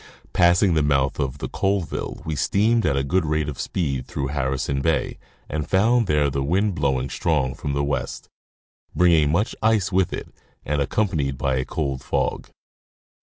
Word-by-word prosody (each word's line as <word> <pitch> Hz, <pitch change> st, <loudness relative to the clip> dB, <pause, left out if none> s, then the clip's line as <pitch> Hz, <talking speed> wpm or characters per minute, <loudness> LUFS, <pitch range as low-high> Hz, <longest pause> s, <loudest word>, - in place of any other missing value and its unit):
Passing 90 Hz, +1 st, +4 dB
the 80 Hz, -, +3 dB
mouth 70 Hz, -2 st, +1 dB
of 70 Hz, -1 st, -2 dB
the -, -, -4 dB
Colville 95 Hz, -5 st, -2 dB
we 80 Hz, -1 st, -2 dB
steamed 110 Hz, -, +2 dB
at 70 Hz, -, +1 dB
a 70 Hz, -, +1 dB
good 90 Hz, +6 st, +1 dB
rate 75 Hz, -1 st, 0 dB
of 70 Hz, -3 st, -6 dB
speed 70 Hz, -8 st, -2 dB
through 70 Hz, -2 st, -3 dB
Harrison 70 Hz, -1 st, -1 dB
bay 75 Hz, -3 st, 0 dB, 0.3 s
and 75 Hz, 0 st, -4 dB
found 115 Hz, +4 st, +3 dB
there 75 Hz, -1 st, +2 dB
the 70 Hz, 0 st, -1 dB
wind 95 Hz, +9 st, +1 dB
blowing 70 Hz, -4 st, 0 dB
strong 70 Hz, -1 st, 0 dB
from 70 Hz, +3 st, -4 dB
the 70 Hz, 0 st, 0 dB
west, 70 Hz, -1 st, -3 dB, 0.7 s
bringing 80 Hz, -5 st, +4 dB
much 100 Hz, +7 st, 0 dB
ice 110 Hz, -3 st, +2 dB
with 95 Hz, -1 st, +2 dB
it -, -, -5 dB, 0.4 s
and 75 Hz, 0 st, 0 dB
accompanied 70 Hz, -5 st, 0 dB
by 65 Hz, 0 st, 0 dB
a 65 Hz, -, -1 dB
cold 70 Hz, -4 st, -3 dB
fog. -, -, -2 dB
75 Hz, 170 wpm, -23 LUFS, 70-90 Hz, 0.7 s, Passing